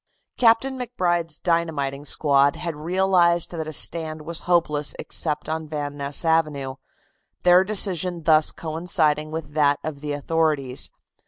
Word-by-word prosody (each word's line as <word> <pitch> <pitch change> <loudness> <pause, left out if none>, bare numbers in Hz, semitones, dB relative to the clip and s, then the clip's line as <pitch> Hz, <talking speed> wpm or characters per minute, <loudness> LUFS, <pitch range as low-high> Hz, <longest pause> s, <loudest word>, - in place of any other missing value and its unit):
Captain 255 +3 +3
MacBride's 175 -10 -1
dynamiting 150 -5 -1
squad 140 -2 +2
had 170 -3 -5
realized 175 +1 +2
that 160 -3 -5
a - - -5
stand 155 0 -1
was 165 +1 -3
hopeless 150 -4 +2
except 150 -2 -3
on 160 0 -3
Van 145 -1 -4
Ness 140 +3 -1
Avenue, 150 -5 0 0.7
their 180 +1 +6
decision 185 -4 +1
thus 155 -1 +4
coinciding 155 -2 0
with 160 -1 -6
that 145 -2 +3
of 150 -3 -6
the 150 -1 -3
authorities. 145 -3 -1
160 Hz, 135 wpm, -23 LUFS, 150-175 Hz, 0.7 s, their